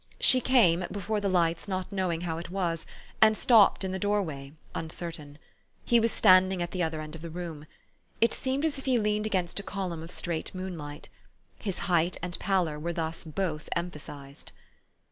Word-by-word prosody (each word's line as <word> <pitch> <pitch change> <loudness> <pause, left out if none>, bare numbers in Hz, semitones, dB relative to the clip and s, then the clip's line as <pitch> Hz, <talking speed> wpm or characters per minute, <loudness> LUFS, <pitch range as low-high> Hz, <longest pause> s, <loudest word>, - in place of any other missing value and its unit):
She 255 - +6
came, 185 -10 +4
before 205 +1 -2
the 200 - 0
lights, 165 -3 +1
not 185 -1 -3
knowing 185 -4 -1
how 165 -2 -3
it 170 - -7
was, 175 -3 -2 0.3
and 220 0 +6
stopped 220 -5 +5
in 190 - -2
the 190 - -3
doorway, 175 -10 -1 0.2
uncertain. 160 -3 -5 0.5
He 235 - +5
was 230 0 +2
standing 185 -2 +5
at 175 0 -2
the 185 - -2
other 160 -2 -1
end 155 0 -8
of 165 - -9
the 170 - -6
room. 160 -3 -7 0.5
It 230 -1 +3
seemed 270 +3 0
as 290 -3 0
if - - -10
he 260 -2 +3
leaned 210 -1 +1
against 185 -3 0
a - - -3
column 185 -4 -4
of 165 - -8
straight 170 0 -3
moonlight. 165 -5 -6 0.5
His 195 -4 -3
height 175 -1 +2
and 180 -1 -3
pallor 180 -6 0
were 170 +3 -3
thus 165 -1 -3
both 160 -1 -3
emphasized. 145 -5 -6
180 Hz, 185 wpm, -29 LUFS, 165-200 Hz, 0.5 s, She